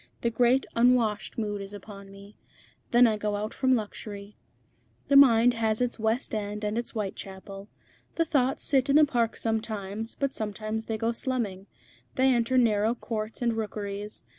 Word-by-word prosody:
The 235 - 0
great 245 +3 +3
unwashed 230 -3 +2
mood 205 -3 -2
is 195 +1 -7
upon 200 0 -11
me. 200 +1 -14 0.5
Then 245 +1 +6
I 220 -2 +2
go 210 0 -2
out 210 +1 -4
from 260 -1 +2
luxury. 210 -2 -6 0.7
The 280 - +4
mind 245 -3 +7
has 220 -2 0
its 245 -1 -1
West 220 +4 -1
End 210 0 -3
and 210 +1 -1
its 235 0 -2
Whitechapel. 195 -1 -6 0.5
The 330 - +1
thoughts 270 -4 +1
sit 270 -1 +2
in 275 - +4
the 305 0 +7
Park 235 -5 0
sometimes, 220 -1 -3
but 275 -1 -2
sometimes 215 +1 -4
they 225 - -2
go 225 +2 0
slumming. 225 -6 -3 0.5
They 260 0 +4
enter 240 +2 +1
narrow 220 -1 +3
courts 220 0 -4
and 235 -1 +2
rookeries. 210 -1 -5
220 Hz, 165 wpm, -27 LUFS, 210-245 Hz, 0.7 s, mind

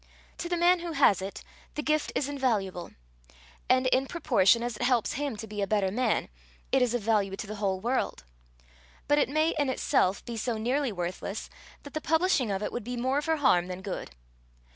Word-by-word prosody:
To 345 - -4
the 350 - 0
man 350 +1 +4
who 340 -1 -5
has 270 - +4
it, 195 +1 -6 0.3
the 300 - -3
gift 305 0 +1
is 275 - 0
invaluable; 220 -11 -1 0.8
and, 255 0 +4
in 260 +1 +2
proportion 240 - +3
as 240 -2 -3
it - - -9
helps 240 -2 +2
him 280 -5 -3
to 220 - -6
be 210 -1 -5
a 200 - 0
better 200 -2 +1
man, 250 +5 0 0.4
it 265 - +3
is 245 -1 +2
of 240 - -2
value 205 -3 +1
to 215 - -6
the 215 +1 -7
whole 195 -2 0
world; 240 - -1 0.8
but 290 +1 +4
it - - +2
may, 310 +3 +2
in 285 -2 +2
itself, 205 -7 +1
be 235 -2 -5
so 225 +1 -1
nearly 255 +4 0
worthless, 185 +2 -5 0.3
that 285 - -11
the 310 - -3
publishing 320 - +2
of 195 +1 -2
it - - -2
would 240 - -4
be 245 +2 -5
more 260 +4 +1
for 320 +1 +1
harm 180 - +3
than 185 +1 -6
good. 195 -2 -5
245 Hz, 205 wpm, -28 LUFS, 205-285 Hz, 0.8 s, man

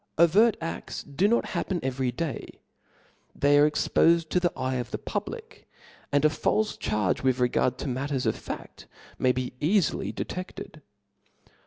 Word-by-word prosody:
Overt 195 +7 +5
a6U 165 -3 -6
do 195 +8 +4
not 235 +2 +2
happen 185 -3 -1
every 130 -1 -1
day; 155 +3 -5 0.8
they 145 0 +4
are 150 +1 +6
expofed 165 +2 +2
to 180 - +2
the 175 -1 +1
eye 130 0 -1
of 120 -2 -4
the - - -3
public; - - -6 0.4
and 145 +1 +3
a - - +7
falfe 210 +7 0
charge 105 -3 0
with 130 -2 +2
regard 125 0 +1
to - - -5
matters 135 +1 -2
of - - +1
faft - - -8 0.3
may 130 - +4
be 125 0 -3
cafily 180 +3 +1
dc - - -4
tcfted. 180 -3 -7
145 Hz, 160 wpm, -27 LUFS, 130-170 Hz, 0.8 s, a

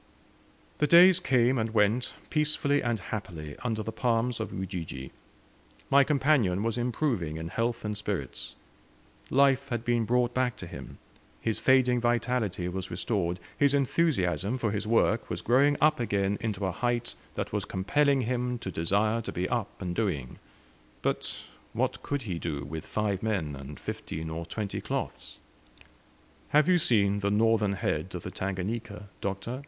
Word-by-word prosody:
The 150 - +3
days 180 +2 +8
came 130 -5 +3
and 110 0 -2
went 110 +4 +2 0.2
peacefully 150 -2 +2
and 120 -3 0
happily, 85 -7 -6
under 110 -3 -1
the 110 - -4
palms 115 +1 0
of 110 - -3
Ujiji. 85 -8 -5 0.8
My 140 0 +7
companion 135 -10 +2
was 115 -1 0
improving 120 - -1
in 80 +1 -5
health 115 +3 -1
and 105 0 -2
spirits. 105 - -4 0.7
Life 140 0 +3
had 120 -2 -2
been 120 -2 +2
brought 125 +1 +2
back 125 -2 +1
to - - -7
him; - - -9 0.4
his 110 -1 0
fading 125 -2 +4
vitality 120 -6 0
was 95 0 -4
restored, 90 -1 -1 0.2
his 145 -1 +3
enthusiasm 130 - +1
for 115 -4 0
his 105 0 -2
work 115 0 +2
was - - -4
growing 140 +4 +4
up 155 0 +4
again 100 -3 0
into 105 -3 -2
a 95 - 0
height 120 +4 -1 0.2
that - - -3
was - - 0
compelling 135 +9 +2
him 125 +1 -1
to 95 - -5
desire 100 +8 +1
to - - -5
be 90 +1 -2
up 120 -4 -2
and 90 -2 -3
doing. 85 - -2 0.6
But - - -2 0.3
what - - -1
could 145 -2 -2
he 90 -6 -3
do, 70 -3 -3
with 80 +3 -6
five 105 -3 -1
men 95 -10 -1
and 70 +2 -9
fifteen 80 0 -5
or 85 +1 -5
twenty 105 -3 -4
cloths? - - -4 1.1
"Have 150 0 +4
you 180 -1 +5
seen 100 -7 +3
the 100 0 0
northern 105 -1 +3
head 95 - -2
of - - -5
the - - -5
Tangannka, 100 +3 -4
Doctor?" 100 +6 -3
110 Hz, 160 wpm, -29 LUFS, 95-125 Hz, 1.1 s, days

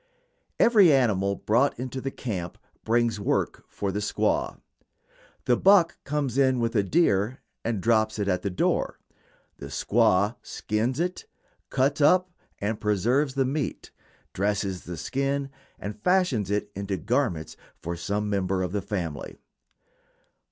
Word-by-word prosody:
Every 210 -8 +6
animal 100 -8 +2
brought 120 +9 +1
into 130 +1 -4
the 135 - -2
camp 95 -10 -5 0.3
brings 115 -1 +1
work 100 - -1
for 100 -1 -3
the 100 - -2
squaw. 305 - -1 0.9
The - - +4
buck 185 -3 +4
comes 140 -3 -1
in 130 -2 +3
with 115 0 -1
a 105 - +4
deer 105 - +2 0.3
and 115 -3 -1
drops 110 -1 +2
it 100 -2 -1
at 90 -2 +1
the 100 - -2
door. 90 - 0 0.6
The - - -8
squaw 105 -1 +2
skins 115 +6 -2
it, 180 +1 -2 0.4
cuts 140 +3 +1
up 180 +5 +4 0.3
and 105 +1 -3
preserves 120 +7 +1
the 135 -1 +2
meat, 140 +1 -3 0.4
dresses 100 -1 -1
the 85 -1 -6
skin 135 - -2 0.3
and 105 +1 -7
fashions 160 - +2
it 105 0 -1
into 100 0 -3
garments 105 - -1 0.2
for 85 +1 -4
some 100 +5 -2
member 95 -2 0
of 90 - -3
the 100 +1 -1
family. 90 -8 -5
110 Hz, 140 wpm, -26 LUFS, 100-135 Hz, 0.9 s, Every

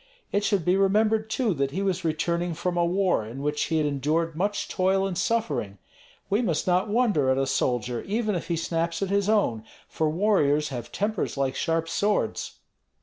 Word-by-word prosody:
It 205 +1 +1
should 200 -6 +1
be 180 +2 +3
remembered 215 +3 +2
too 225 -3 +1
that 140 -3 0
he 190 +8 -3
was 185 -2 -1
returning 170 +2 -1
from 175 +2 -2
a 175 - +2
war 180 - +1
in 120 +6 -7
which 150 0 0
he 160 -1 0
endured 150 +3 0
much 200 +5 -1
toil 190 +1 +1
and 190 -2 -3
suffering. 215 - -1 0.5
We 205 +4 +1
must 175 -10 0
not 185 +3 +2
wonder 205 - +2
at 130 - +2
a 135 - +1
soldier, 125 -2 -1
even 215 +1 0
if 175 - -3
he 170 - 0
snaps 165 +2 -1
at 195 - -2
his 200 0 +1
own, 120 - +1 0.2
for 160 -1 -1
warriors 150 -5 +2
have 120 -4 -6
tempers 210 -6 -2
like 135 -1 0
sharp 165 +3 0
swords." 205 +5 -1
175 Hz, 190 wpm, -26 LUFS, 150-200 Hz, 0.5 s, be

